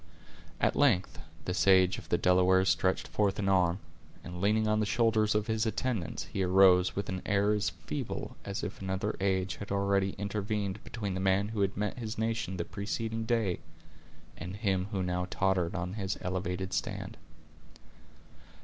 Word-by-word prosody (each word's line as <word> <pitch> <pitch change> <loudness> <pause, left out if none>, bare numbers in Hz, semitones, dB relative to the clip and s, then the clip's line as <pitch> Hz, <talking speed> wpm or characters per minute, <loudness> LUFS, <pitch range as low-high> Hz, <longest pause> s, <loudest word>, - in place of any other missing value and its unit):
At - - +2
length, 120 -11 +2 0.3
the 90 - -1
sage 95 -1 +4
of - - -14
the - - +3
Delawares 95 +1 +4
stretched 95 0 +1
forth 100 -2 0
an 100 - -1
arm, 90 -2 +3 0.5
and 90 0 -7
leaning 110 +2 +2
on 105 0 +2
the 105 - +1
shoulders 110 -2 +2
of 105 -1 +1
his 110 0 0
attendants, 110 -5 -2
he 100 - -4
arose 95 0 +5
with 100 - -2
an 95 0 -3
air 100 +1 +2
as 105 -1 +1
feeble - - -5
as 100 +1 -4
if 105 -1 -5
another 95 +2 -2
age 95 -1 0
had 100 - -7
already 100 -1 +1
intervened 100 0 -3
between 105 -5 -4
the 95 - -3
man 95 +2 +2
who 110 -2 -2
had 100 -1 0
met 105 +4 -2
his 110 -1 -5
nation 110 -4 -2
the 85 - -2
preceding 110 +2 -3
day, 110 -6 0 0.8
and 90 +4 -7
him 95 -3 0
who 95 -3 -1
now 90 0 -1
tottered 95 -2 0
on 90 +1 -3
his 95 -3 -3
elevated 95 0 -3
stand. - - -3
100 Hz, 170 wpm, -30 LUFS, 95-105 Hz, 0.8 s, arose